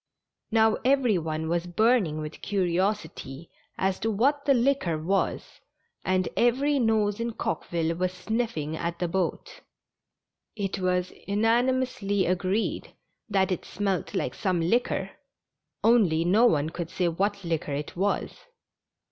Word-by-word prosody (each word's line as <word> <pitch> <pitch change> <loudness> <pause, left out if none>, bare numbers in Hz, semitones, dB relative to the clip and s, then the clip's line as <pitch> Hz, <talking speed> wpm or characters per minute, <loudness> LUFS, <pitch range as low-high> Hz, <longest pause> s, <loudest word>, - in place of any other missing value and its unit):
" - - -61
Now, 220 -1 +4
every 255 -6 +3
one 160 0 -3
was 170 +1 -1
burning 190 -5 +2
with 155 0 -7
curiosity 180 -6 -2 0.3
as 190 0 0
to 225 - -1
what 275 +7 +1
the 280 - +5
liquor 240 - +1
was, 185 +6 -2 0.4
and 185 0 +1
every 270 +4 +2
nose 220 -3 +1
in 230 0 -2
Coqueville 165 -5 -2
was 180 +1 -1
sniffing 185 -7 -2
at 170 +1 -3
the 175 - -1
boat. 180 0 -3 0.9
It 200 -2 -3
was 180 -1 0
unanimously 225 -1 +1
agreed 185 +4 -1 0.3
that 195 -1 +2
it 180 - -2
smelt 195 0 -2
like - - -1
some 185 -4 0
liquor, 205 +10 0 0.7
only 190 -9 +4
no 215 +7 +5
one 155 -6 +1
could 170 -1 -5
say 185 -1 0
what 200 +4 -1
liquor 165 -4 -2
it 145 +1 -5
was. 200 +3 0
190 Hz, 135 wpm, -27 LUFS, 170-225 Hz, 0.9 s, the